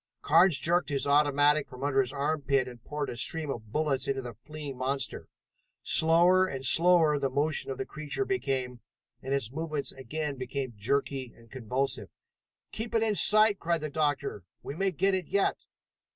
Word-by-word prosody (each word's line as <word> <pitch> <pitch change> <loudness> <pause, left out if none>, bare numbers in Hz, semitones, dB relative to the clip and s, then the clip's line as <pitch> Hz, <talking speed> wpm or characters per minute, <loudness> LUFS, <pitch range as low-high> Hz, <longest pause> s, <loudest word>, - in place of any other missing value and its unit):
Carnes 165 +1 +5
jerked 170 +2 0
his 140 -2 -1
automatic 145 +1 +3
from 130 +1 -10
under 140 -1 +2
his 130 -1 -3
armpit 140 -2 0
and 120 -2 -11
poured 150 -1 -4
a - - -7
stream 150 +4 -1
of 110 -4 -8
bullets 150 -1 -1
into 135 -1 -2
the 120 -1 -7
fleeing 145 +4 -9
monster. 130 +1 -2 0.6
Slower 175 +3 +4
and 135 -5 -5
slower 165 -1 +4
the 135 -1 -1
motion 145 +3 -1
of 135 - -4
the 130 - -4
creature 155 - -4
became, 130 - -2 0.4
and 135 - -6
its 135 -5 -1
movements 155 -1 -3
again 145 +2 -5
became 130 0 -5
jerky 130 +3 -2
and 115 -1 -20
convulsive. 130 +2 -3 0.6
"Keep 225 +1 -5
it 225 - +3
in 220 -1 +1
sight!" 215 0 +5
cried 170 -1 -1
the 155 -1 -4
doctor. 145 - -1 0.2
"We 140 - -6
may 195 +3 0
get 190 +3 0
it 185 -3 -2
yet!" 200 -1 0
145 Hz, 175 wpm, -28 LUFS, 130-160 Hz, 0.6 s, Carnes